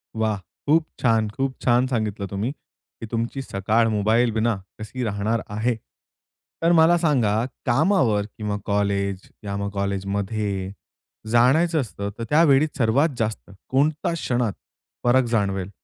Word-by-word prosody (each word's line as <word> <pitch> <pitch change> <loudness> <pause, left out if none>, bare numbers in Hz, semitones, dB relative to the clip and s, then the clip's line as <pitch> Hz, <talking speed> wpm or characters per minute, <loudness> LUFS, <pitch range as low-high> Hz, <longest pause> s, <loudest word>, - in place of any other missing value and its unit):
वाह! 110 -1 0 0.3
खूप 155 +2 +4
छान, 115 -3 +2
खूप 135 +4 -2
छान 125 +1 +3
सांगितलं 110 -5 -2
तुम्ही 105 +6 -2
की 140 - -15
तुमची 115 +3 -2
सकाळ 110 0 +1
मोबाईलविना 110 +1 +2 0.2
कशी 115 +4 -5
राहणार 110 +1 -1
आहे. 110 +4 0 0.9
तर 165 +1 +4
मला 170 +1 +6
सांगा, 120 -10 +2 0.2
कामावर 125 - +2
किंवा 105 -1 -2
कॉलेज 100 -1 0 0.2
किंवा 100 -1 -3
कॉलेजमध्ये 100 0 -2 0.6
जायचं 155 +8 +4
असतं, 100 -5 -5
तर 115 - -4
त्यावेळी 150 -1 +5
सर्वात 135 +6 +3
जास्त 110 -2 -3 0.2
कोणत्या 150 +5 +1
क्षणात 125 -9 -1 0.5
फरक 130 +2 +5
जाणवेल. 100 -4 0
115 Hz, 120 wpm, -23 LUFS, 100-130 Hz, 0.9 s, मला